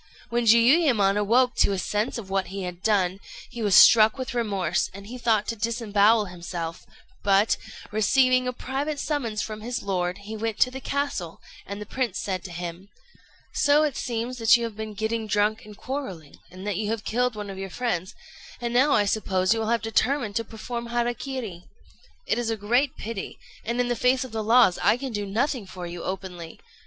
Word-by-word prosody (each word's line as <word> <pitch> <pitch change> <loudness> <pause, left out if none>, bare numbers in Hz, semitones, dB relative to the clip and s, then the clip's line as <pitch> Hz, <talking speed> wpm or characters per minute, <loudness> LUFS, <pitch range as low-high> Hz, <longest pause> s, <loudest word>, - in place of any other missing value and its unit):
When 240 0 0
Jiuyémon 235 - +5
awoke 235 +5 +3
to 200 - +3
a - - -1
sense 210 +6 -1
of 195 -5 -8
what 195 -1 0
he 195 +1 -5
had 180 -1 -6
done, 195 -3 +1 0.3
he 240 -1 -6
was 205 -4 +3
struck 220 +4 +8
with 260 0 -4
remorse, 195 -8 0
and 200 0 -9
he 235 +5 -8
thought 225 -3 +2
to 230 - -2
disembowel 220 -1 +2
himself; 170 -2 -6 0.3
but, 200 +2 +3 0.4
receiving 255 +4 +3
a - - 0
private 275 +4 -3
summons 240 -10 -2
from 215 -1 -6
his 245 +2 -4
lord, 180 -2 -1
he 220 +1 -6
went 220 0 -3
to 255 - +5
the 265 +1 -7
castle, 280 - -3 0.3
and 200 +1 -5
the 210 - -6
prince 255 +2 -2
said 185 -3 -3
to 180 - -7
him 175 +2 -7 0.6
"So 295 +1 +4
it 295 -3 0
seems 240 +1 -3
that 225 +1 +6
you 235 - -4
have 230 -2 -4
been 215 -1 -6
getting 220 +1 -2
drunk 210 +2 +1
and 210 -1 -12
quarrelling, 220 - -6
and 185 +2 -10
that 205 -3 -1
you 210 0 -2
have 225 -1 -2
killed 245 0 0
one 205 -1 -6
of 190 - -8
your 195 0 -5
friends; 190 -4 -3 0.4
and 240 -1 -3
now 265 +4 +4
I 205 - +3
suppose 190 -2 +1
you 225 - -2
will 220 - -2
have 235 -1 +1
determined 225 0 0
to 230 - 0
perform 235 +2 -6
hara 240 0 0
kiri. 235 -10 -6 0.6
It - - 0
is 235 -1 -1
a 225 - -1
great 240 +7 +1
pity, 220 -2 -6 0.3
and 235 +2 -2
in 245 - +2
the 240 - 0
face 255 +3 +2
of 260 - -9
the 220 -1 -3
laws 225 -4 +5
I 205 +6 +4
can 260 -1 -5
do 205 -1 -3
nothing 235 +1 -1
for 180 -1 -7
you 175 0 -6
openly. 180 -3 -6
220 Hz, 205 wpm, -25 LUFS, 195-245 Hz, 0.6 s, struck